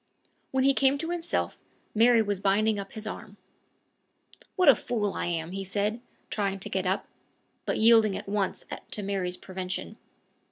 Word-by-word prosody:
When 265 0 +1
he 275 +1 +5
came 270 +1 +3
to 325 +4 -3
himself, 345 -1 -2 0.3
Mary 230 +1 +5
was 205 -2 -1
binding 205 +2 +2
up 195 0 -7
his 220 -1 -7
arm. 210 -1 -7 1.2
"What 365 -4 +3
a 280 - +11
fool 215 -4 -2
I - - -2
am!" 165 -1 -2
he 195 +1 -4
said, 205 +4 -1 0.3
trying 195 -2 -1
to - - -4
get 190 -1 0
up, 190 +2 0 0.6
but - - 0
yielding 220 -3 +5
at - - -8
once 200 -1 -1 0.2
to 210 - -4
Mary's 190 -2 -2
prevention. 185 +3 -5
205 Hz, 165 wpm, -28 LUFS, 195-230 Hz, 1.2 s, a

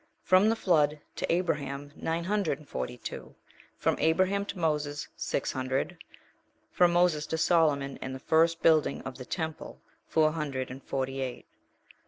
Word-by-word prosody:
From 185 +3 +5
the 225 - +2
flood 155 -9 +3 0.2
of - - -4
Abraham, 145 -5 -1
nine 165 +1 -2
hundred 200 -5 0
and 150 - -17
forty 65 -1 -4
two. - - -8 0.4
From - - +1
Abraham 190 +5 +2
to 200 - -5
Moses, 150 -3 -1
six - - -2
hundred.* 130 +6 -2 0.7
From 175 -1 +4
Moses 170 -4 +2
to 160 - -2
Solomon, 150 -5 +2
and 130 0 -4
the - - -7
first 165 +3 +2
building 160 -2 +3
of 135 0 -7
the 130 - -7
temple, 160 0 -5 0.3
four 155 -1 +3
hundred 140 -5 -3
and 130 +1 -8
forty 135 0 -3
eight. 125 -2 -5
155 Hz, 160 wpm, -29 LUFS, 135-170 Hz, 0.7 s, From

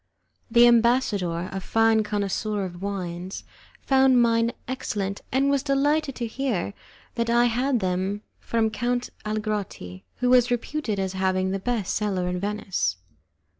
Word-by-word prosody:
The 235 +1 +6
ambassador, 225 -8 +2
a 195 - -3
fine 225 +3 +3
connoisseur 205 0 -2
in 175 -1 -8
wines, 185 -2 -5 0.4
found 265 -2 +4
mine 230 0 +3 0.2
excellent, 205 -6 -3
and 275 +2 +2
was 280 -1 +2
delighted 285 +1 +1
to 240 - -3
hear 230 -5 -2 0.4
that 235 -1 -1
I 240 +1 +4
had 245 +1 +1
them 190 +3 -1 0.2
from 225 -1 0
Count 245 +2 -2 0.2
Algarotti, 210 - -4
who 250 0 +1
was 250 -1 +5
reputed 245 -1 -2
as 190 -1 -2
having 190 0 0
the 195 - -1
best 225 -2 -1
cellar 195 -4 -1
in 180 0 -2
Venice. 200 - -1
215 Hz, 140 wpm, -25 LUFS, 190-245 Hz, 0.4 s, The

